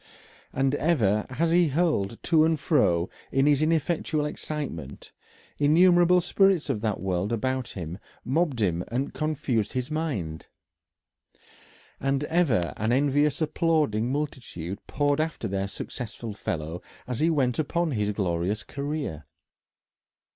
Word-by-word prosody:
And 135 +1 +1
ever 120 - +2
as 160 +6 0
he 175 0 +5
hurried 145 - 0
to 160 -2 +4
and 160 -1 +2
fro 90 - +2 0.2
in 135 +1 +3
his 145 -1 +4
ineffectual 155 -1 +1
excitement, 145 - -5 0.5
innumerable 175 +4 +5
spirits 180 -3 +2
of 110 -6 -3
that 110 -3 -1
world 95 +2 -1
about 130 +2 -1
him 90 0 -6 0.3
mobbed 145 -1 +1
him 90 -3 +1
and 125 +5 -2
confused 145 -8 -1
his 130 +2 -3
mind. 110 - -3 1.5
And 135 +1 0
ever 145 - +1
an 110 +3 0
envious 145 +4 +2
applauding 150 -8 +1
multitude 120 - -4
poured 145 +1 +1
after 160 0 -3
their 95 0 -2
successful 110 +2 -6
fellow 80 -3 -4 0.2
as 125 -2 -4
he 160 - +3
went 135 -6 +1
upon 170 +2 0
his 105 -5 0
glorious 95 +1 -1
career. 140 - -4
135 Hz, 125 wpm, -26 LUFS, 105-155 Hz, 1.5 s, he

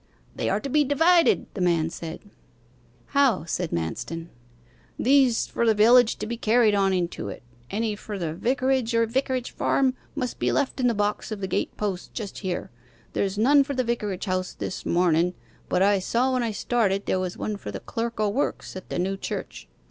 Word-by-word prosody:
'They - - -1
are - - +1
to 280 - -5
be 295 +2 +3
divided,' 325 +5 +4
the 195 - -4
man 170 -3 +2
said. 165 0 -7 0.9
'How?' 275 - +3
said 175 0 -2
Manston. 165 - -4 0.7
'These, 260 -2 +4
for - - -2
the 225 -2 +4
village, 230 +2 +6
to - - -5
be 235 +2 -4
carried 225 -1 +3
on 195 -1 +3
into 175 - -2
it: 100 - -8 0.3
any 215 +1 -1
for 205 0 -7
the 165 -4 -3
vicarage 255 - 0
or 230 0 +4
vicarage 255 +1 -1
farm 265 -2 +1 0.2
must 255 -4 -3
be - - +1
left 280 -1 0
in 250 - +3
the 235 - +1
box 210 +2 -1
of 215 - -4
the 195 - -2
gate - - -2
post 195 -4 -4
just 215 -5 -5
here. 185 -3 -4 0.4
There's 195 0 -1
none 280 +6 +5
for 280 0 -4
the 255 - +1
vicarage 210 -6 -2
house 185 -1 -2
this - - -5
mornen, 175 0 +2 0.3
but 180 +1 +2
I 200 0 +4
saw 245 +7 +1
when 255 - +1
I 235 - 0
started 205 -2 0
there 185 - +1
was 185 -1 -3
one 215 - -3
for 200 - -8
the 100 -1 -5
clerk 230 0 -4
o' 215 - +2
works 220 0 -2
at 185 - -9
the - - -3
new 190 +2 -1
church. - - -6
215 Hz, 200 wpm, -25 LUFS, 185-250 Hz, 0.9 s, village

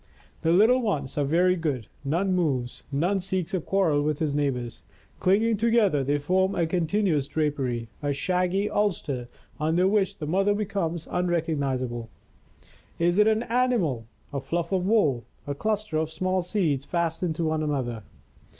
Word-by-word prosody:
The 165 - +2
little 220 +8 +5
ones 150 - -2
are - - +2
very 175 +6 +3
good, 145 - -2 0.2
none 175 +7 0
moves, 135 -9 -1
none 175 +8 +1
seeks 185 0 -3
a 185 - 0
quarrel 165 -5 +2
with 150 0 0
his 150 -2 -1
neighbors. 130 -5 -2 0.4
Clinging 215 +4 +3
together, 215 -9 +3
they 145 +2 +1
form 185 +6 +1
a 170 - +2
continuous 165 -3 +1
drapery, 140 -6 -1
a 145 -1 0
shaggy 180 +6 0
ulster 160 -13 -1 0.3
under 165 +4 +2
which 200 -1 +1
the 155 - -5
mother 195 +6 +2
becomes 190 -6 -2
unrec 175 -2 0
ognizable. 130 -6 -2 0.9
Is 175 +3 +2
it 210 - +6
an 220 +1 +2
animal, 230 - 0 0.3
a 140 - -1
fluff 170 +4 -2
of 185 -1 +1
wool, 150 - +3 0.2
a 145 - -2
cluster 215 +1 -1
of 160 0 0
small 185 +3 0
seeds 170 -7 0
fastened 170 +1 -1
to 165 - -2
one 155 0 0
another? 130 -7 -2
170 Hz, 160 wpm, -26 LUFS, 145-195 Hz, 0.9 s, it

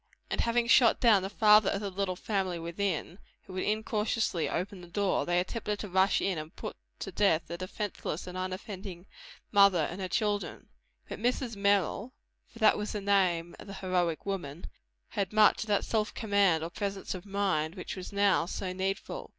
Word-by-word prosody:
and - - +1
having 235 0 +1
shot 235 0 +5
down 220 -5 +5
the 190 - -4
father 210 -1 +5
of 200 - -1
the 200 -1 -4
little 190 -1 -2
family 190 -2 -2
within, 170 +1 -3 0.2
who 185 - -12
had 185 - -2
incautiously 215 -4 0
opened 180 +1 -4
the - - -11
door, 200 +2 0
they 175 0 +2
attempted 210 +2 -3
to 205 - -6
rush 190 +1 +3
in 185 -5 0
and 155 +1 -9
put - - -6 0.2
to - - -6
death 170 -6 +2
the 170 - -6
defenceless 185 -2 -4
and 180 - -8
unoffending 185 0 -6 0.5
mother 200 -6 +5
and 185 +3 -6
her 185 - -2
children. 205 +1 -2 0.4
But - - -7
Mrs. 245 0 -1
Merrill 200 +4 +1 0.3
for - - -17
that 220 -2 +4
was 210 - -3
the 210 - -3
name 185 -4 +1
of - - -11
the 195 - -7
heroic 180 -4 -1
woman 175 -6 -4 0.4
had 195 -2 -2
much 215 0 +4
of - - -18
that 205 -1 +1
self 215 -1 -1
command, 200 -7 +2
or 165 - -5
presence 200 +1 -4
of 185 -2 -7
mind, 190 -5 0
which 180 - -6
was 185 +1 -7
now 200 -4 +2
so 185 0 -4
needful. 190 +1 -3
195 Hz, 190 wpm, -30 LUFS, 180-210 Hz, 0.5 s, shot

